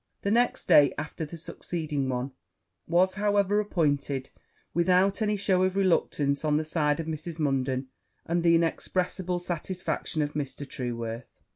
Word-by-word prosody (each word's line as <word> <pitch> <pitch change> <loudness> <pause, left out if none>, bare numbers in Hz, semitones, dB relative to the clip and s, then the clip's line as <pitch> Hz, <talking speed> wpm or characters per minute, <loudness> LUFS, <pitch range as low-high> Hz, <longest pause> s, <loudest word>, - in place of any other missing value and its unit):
The 200 - 0
next 240 +2 +2
day 145 -1 +7
after 155 +1 -4
the 165 +3 -9
succeeding 155 -4 -3
one 125 +1 -2 0.6
was, 180 +3 +3
however, 205 0 +2
appointed 145 -9 0 0.4
without 185 +4 +3
any 210 -1 +1
shew 190 -2 +2
of 185 0 +1
reluctance 155 -7 +1
on 150 -1 +2
the 155 - -1
side 150 -2 +1
of 165 - -3
Mrs. 160 +1 -5
Munden, 135 -2 0 0.4
and 170 +1 0
the 170 0 +5
inexpressible 180 +2 0
satisfaction 175 -2 -2
of 145 0 -4
Mr. 145 -1 -4
Trueworth. 115 -2 -5
165 Hz, 145 wpm, -27 LUFS, 145-185 Hz, 0.6 s, day